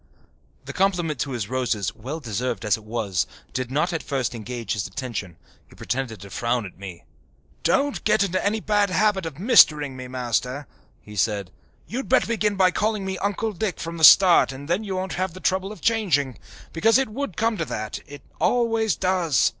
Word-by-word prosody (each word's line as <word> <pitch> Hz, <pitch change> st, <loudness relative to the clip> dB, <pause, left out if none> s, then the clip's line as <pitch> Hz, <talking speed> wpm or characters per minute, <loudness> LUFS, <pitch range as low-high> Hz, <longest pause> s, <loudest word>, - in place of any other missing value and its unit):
The -, -, -7 dB
compliment 180 Hz, -5 st, 0 dB
to 140 Hz, -, -1 dB
his 115 Hz, -5 st, -3 dB
roses, 120 Hz, -5 st, -1 dB
well 135 Hz, +9 st, -6 dB
deserved 115 Hz, -3 st, -3 dB
as 105 Hz, -2 st, +3 dB
it 110 Hz, -, -12 dB
was, 105 Hz, -6 st, -1 dB, 0.3 s
did 130 Hz, -1 st, -3 dB
not 155 Hz, +7 st, 0 dB
at 165 Hz, -, -2 dB
first 130 Hz, -4 st, -2 dB
engage 115 Hz, -1 st, -4 dB
his 105 Hz, -2 st, -2 dB
attention. 105 Hz, -, -5 dB, 0.3 s
He -, -, -17 dB
pretended 125 Hz, -4 st, -4 dB
to 100 Hz, -1 st, -11 dB
frown 120 Hz, +1 st, -1 dB
at 95 Hz, -, -11 dB
me. 95 Hz, -3 st, -9 dB, 0.6 s
"Don't 285 Hz, 0 st, +1 dB
get 215 Hz, -1 st, +3 dB
into 185 Hz, -1 st, -1 dB
any 215 Hz, +2 st, 0 dB
bad 205 Hz, -1 st, +2 dB
habit 195 Hz, -2 st, +1 dB
of 150 Hz, -4 st, -8 dB
mistering 150 Hz, -, +5 dB
me, 130 Hz, 0 st, -7 dB
Master," 125 Hz, +2 st, -2 dB, 0.4 s
he 105 Hz, -, -11 dB
said. 100 Hz, -1 st, 0 dB, 0.3 s
"You'd 260 Hz, +4 st, -5 dB
better 260 Hz, -, +4 dB
begin 215 Hz, -3 st, 0 dB
by 185 Hz, -1 st, +4 dB
calling 210 Hz, +1 st, -1 dB
me 190 Hz, -1 st, -3 dB
Uncle 205 Hz, +2 st, -1 dB
Dick 195 Hz, -1 st, -3 dB
from 165 Hz, 0 st, -5 dB
the 160 Hz, -, -4 dB
start 175 Hz, -3 st, +8 dB
and 135 Hz, +2 st, -9 dB
then 175 Hz, +6 st, 0 dB
you 195 Hz, -3 st, -4 dB
won't 185 Hz, -1 st, -3 dB
have 185 Hz, -2 st, -1 dB
the -, -, -8 dB
trouble 190 Hz, +1 st, 0 dB
of 210 Hz, -6 st, -11 dB
changing. 165 Hz, -, +1 dB, 0.3 s
Because 225 Hz, +8 st, +4 dB
it 265 Hz, -3 st, 0 dB
would 225 Hz, -, -5 dB
come 225 Hz, 0 st, +1 dB
to 165 Hz, -, -2 dB
that 110 Hz, -6 st, -5 dB
it 145 Hz, -1 st, -11 dB, 0.2 s
always 225 Hz, -3 st, +2 dB
does. 175 Hz, -8 st, +2 dB
160 Hz, 195 wpm, -24 LUFS, 120-200 Hz, 0.6 s, start